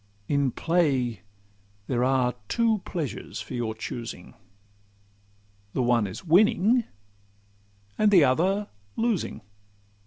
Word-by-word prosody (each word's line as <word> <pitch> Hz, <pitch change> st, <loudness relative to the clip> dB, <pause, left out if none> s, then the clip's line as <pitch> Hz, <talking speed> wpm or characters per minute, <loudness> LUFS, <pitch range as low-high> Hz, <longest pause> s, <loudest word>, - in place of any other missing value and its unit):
In 140 Hz, -2 st, +2 dB
play, 135 Hz, -, 0 dB, 0.6 s
there 125 Hz, +1 st, 0 dB
are 130 Hz, -1 st, +2 dB
two 225 Hz, -, +2 dB
pleasures 160 Hz, -7 st, -5 dB
for -, -, -7 dB
your 115 Hz, -3 st, -2 dB
choosing— 110 Hz, -3 st, -7 dB, 1.4 s
The 130 Hz, -, 0 dB
one 120 Hz, -3 st, +2 dB
is 95 Hz, -, -8 dB
winning, 210 Hz, +6 st, +4 dB, 1.1 s
and 215 Hz, -, +5 dB
the 185 Hz, -6 st, +6 dB
other 185 Hz, +10 st, +1 dB, 0.3 s
losing. 225 Hz, -, -1 dB
140 Hz, 100 wpm, -26 LUFS, 120-195 Hz, 1.4 s, the